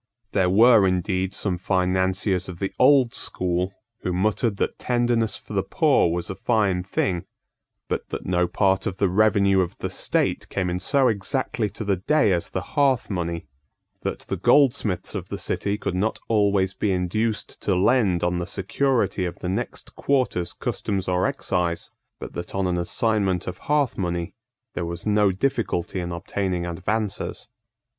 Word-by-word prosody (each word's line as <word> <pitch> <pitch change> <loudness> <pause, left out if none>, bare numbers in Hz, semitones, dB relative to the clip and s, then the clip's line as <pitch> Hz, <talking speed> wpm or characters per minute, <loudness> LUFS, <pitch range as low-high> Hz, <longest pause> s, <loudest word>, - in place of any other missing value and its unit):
There 95 -3 +2
were 110 +1 +6
indeed 95 +1 0
some 95 -3 -2
financiers 95 0 +1
of 90 - -7
the 95 +2 -3
old 130 -2 +5
school 90 +1 -1 0.3
who 90 - -2
muttered 105 +3 0
that - - -2
tenderness 120 -2 +1
for - - -11
the - - +2
poor 85 - +2
was 85 0 -2
a - - -4
fine 100 -6 +1
thing; 90 -2 -1 0.6
but - - -3
that - - -5
no 90 0 +1
part 95 +1 +1
of 95 - -3
the 100 - +2
revenue 100 0 +3
of 90 -1 -3
the - - -4
state - - 0
came 90 -2 -1
in 90 - -2
so 135 +7 +3
exactly 110 +1 -1
to 110 +3 -6
the 100 -2 +1
day 145 - +2
as 85 -2 0
the - - -3
hearth 135 -6 +2
money; 85 -3 -3 0.6
that - - -3
the - - -4
goldsmiths 120 -10 +2
of 95 -3 -5
the 100 - -4
City 100 0 -1
could 100 - -3
not 100 +5 0
always 100 -3 +2
be 105 - -1
induced 105 +5 -1
to 100 - +1
lend 95 -2 +3
on 90 0 +1
the 85 - -3
security 115 +2 0
of 85 - -5
the 90 - -4
next 95 - -4
quarter's 130 -11 0
customs 95 -2 -3
or 90 0 +2
excise, 85 -1 -2 0.3
but - - -8
that 85 - -6
on 95 -1 0
an 90 -1 0
assignment 100 -1 0
of 90 0 -6
hearth 145 -6 +2
money 85 -2 -2 0.4
there - - -3
was 85 0 -5
no 105 -2 +3
difficulty 100 -4 -1
in 85 -1 -4
obtaining 90 +1 -2
advances. 100 +4 -3
95 Hz, 170 wpm, -24 LUFS, 90-110 Hz, 0.6 s, were